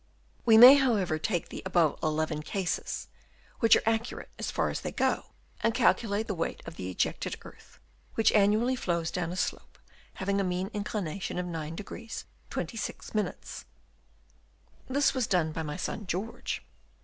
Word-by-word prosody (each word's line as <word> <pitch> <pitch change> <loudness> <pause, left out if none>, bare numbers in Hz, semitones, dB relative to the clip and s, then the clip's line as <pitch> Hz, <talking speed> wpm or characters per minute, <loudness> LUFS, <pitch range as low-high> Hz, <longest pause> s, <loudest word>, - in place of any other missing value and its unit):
We 225 -2 +7
may, 250 +4 +12
however, 205 - +2
take 175 0 -1
the - - -6
above 175 -5 +2
eleven 155 0 0
cases, 185 +3 -3 0.5
which 230 - +7
are - - +1
accurate 225 +2 -1
as - - -2
far - - 0
as - - -4
they - - -4
go, - - 0 0.4
and 230 - +1
calculate 225 -3 +2
the 210 - -2
weight 165 -3 -2
of 165 - -8
the 90 - -5
ejected 90 - -1
earth - - -15 0.4
which 225 - +4
annually 215 +5 +3
flows 170 -7 -1
down 175 -1 -2
a - - -4
slope - - -3 0.4
having 200 +1 0
a - - +1
mean 185 +2 -2
inclination 200 -4 -3
of 180 - -1
9° 170 +7 -6 0.3
26'. 215 -1 -4 1.2
This 280 +2 +3
was 255 -4 0
done 175 -5 +2
by 160 - -3
my 150 +1 -4
son 205 +2 -4
George. 195 +6 -3
195 Hz, 155 wpm, -29 LUFS, 165-225 Hz, 1.2 s, may